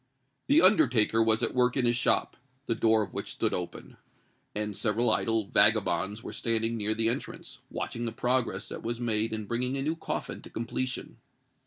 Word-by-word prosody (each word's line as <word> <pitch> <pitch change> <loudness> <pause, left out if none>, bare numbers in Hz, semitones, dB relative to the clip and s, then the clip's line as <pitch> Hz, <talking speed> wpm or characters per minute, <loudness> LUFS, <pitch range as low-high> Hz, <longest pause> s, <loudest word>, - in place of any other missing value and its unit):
The 290 +4 +5
undertaker 120 - +4
was 110 +1 +3
at 115 - 0
work 125 0 +2
in 130 - +2
his 120 0 +3
shop, 125 - +1 0.3
the - - 0
door 110 -1 +3
of - - -9
which - - -3
stood - - -1
open; - - -5 0.6
and 105 -1 -2
several 115 +2 +1
idle 115 -1 +1
vagabonds 100 0 +2
were - - -7
standing 115 0 0
near 110 -1 -1
the 115 0 +1
entrance, 115 - -4
watching 120 - -4
the 115 - -2
progress 120 -4 -1
that - - -6
was 120 +1 -3
made 115 -2 0
in 110 -1 -3
bringing 125 +5 -1
a 135 - -2
new 155 +3 0
coffin 165 - -5
to - - -12
completion. 125 +2 -4
115 Hz, 185 wpm, -29 LUFS, 110-125 Hz, 0.6 s, The